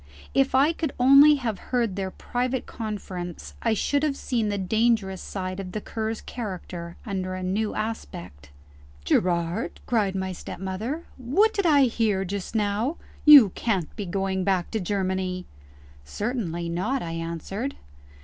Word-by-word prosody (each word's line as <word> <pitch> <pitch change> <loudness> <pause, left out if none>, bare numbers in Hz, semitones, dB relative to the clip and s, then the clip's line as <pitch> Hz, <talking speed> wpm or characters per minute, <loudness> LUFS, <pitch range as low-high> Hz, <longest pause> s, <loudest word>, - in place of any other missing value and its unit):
If 270 -1 +3
I 285 +5 +5
could 315 -4 -3
only 275 +4 +8
have 230 -8 -3
heard 235 -6 +1
their 195 -1 -2
private 250 +5 -2
conference, 190 -6 -6
I 230 -2 +2
should 285 +7 +1
have 290 -2 0
seen 230 -4 -1
the 205 - -1
dangerous 205 -1 +1
side 185 -1 -4
of 185 -2 -6
the 215 - -2
Cur's 220 +1 -4
character 180 -6 -6
under 185 -3 -3
a 185 - -5
new 205 +4 -1
aspect. 180 - -5 0.6
"Gerard!" 170 - 0
cried 210 -5 +1
my 190 0 -2
stepmother, 195 - -5
"what 310 - +2
did 400 -3 +1
I 290 -3 +6
hear 220 -6 +1
just 200 +3 -5
now? 215 +8 0 0.3
You 285 -9 +10
can't 190 -4 -2
be 205 -3 -5
going 190 +1 -1
back 185 -2 0
to 220 - -1
Germany!" 185 -1 -1 0.6
"Certainly 175 - -3
not," 215 +11 -1
I 165 - -4
answered. 170 - -4
205 Hz, 150 wpm, -25 LUFS, 185-245 Hz, 0.6 s, You